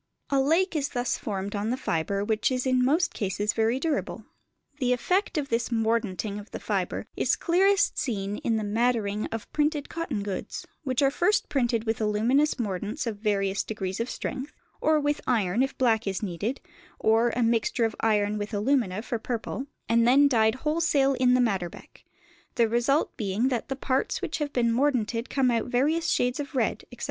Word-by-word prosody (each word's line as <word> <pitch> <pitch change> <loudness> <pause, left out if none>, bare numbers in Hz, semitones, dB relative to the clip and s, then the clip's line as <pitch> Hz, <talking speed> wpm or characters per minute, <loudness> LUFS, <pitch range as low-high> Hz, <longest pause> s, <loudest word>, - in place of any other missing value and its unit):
A 275 - +3
lake 335 +6 +2
is 285 -2 0
thus 245 -1 -1
formed 200 -1 -4
on 205 +2 -1
the 250 - 0
fibre 195 -1 -1
which 220 +4 +1
is 255 0 -1
in 255 -1 +3
most 315 +7 +2
cases 205 +1 -1
very 225 +3 +1
durable. 310 0 -2 0.5
The 250 -2 +2
effect 365 - 0
of 285 -2 -2
this 230 +1 0
"mordanting" 220 -3 -1
of 205 - -11
the - - -6
fibre - - -2
is - - +2
clearest 390 +3 +2
seen 205 -4 -2
in 230 - 0
the 215 - -2
maddering 215 -1 0
of 225 -1 -7
printed 295 -1 0
cotton 295 -11 -3
goods, 200 -2 -5 0.2
which 260 -1 0
are 275 - +4
first 405 +8 +1
printed 240 -5 +1
with 225 -1 -2
aluminous 230 +8 +2
mordants 210 - -3
of 225 -3 -3
various 200 -2 0
degrees 190 -3 -4
of 230 +2 -2
strength 265 +2 -5 0.3
(or 310 0 +3
with 290 0 0
iron 220 -3 +2
if 270 0 -1
black 225 -4 +2
is 195 +2 -2
needed, 205 +7 -3 0.4
or 225 +2 +3
a 245 - +1
mixture 230 +1 +1
of 225 - -2
iron 210 -1 +1
with 205 +1 -4
alumina 215 -3 +1
for 235 -1 -3
purple), 245 +4 -4 0.2
and 230 0 +3
then 280 +3 +6
dyed 220 -4 +3
wholesale 300 -3 +2
in 250 -1 +3
the - - +3
madder 195 -8 +1
beck: - - -15 0.5
the 235 -2 +3
result 240 +6 +1
being 210 +4 0
that 245 0 -2
the 270 - -1
parts 265 0 -1
which - - -3
have 295 -1 -2
been 235 -3 +1
mordanted 240 -3 0
come 260 -3 +2
out 230 -2 0
various 295 +7 +1
shades 250 +2 +1
of 280 -1 -5
red, 240 -4 0
etc. 245 - -12
235 Hz, 190 wpm, -27 LUFS, 215-275 Hz, 0.5 s, then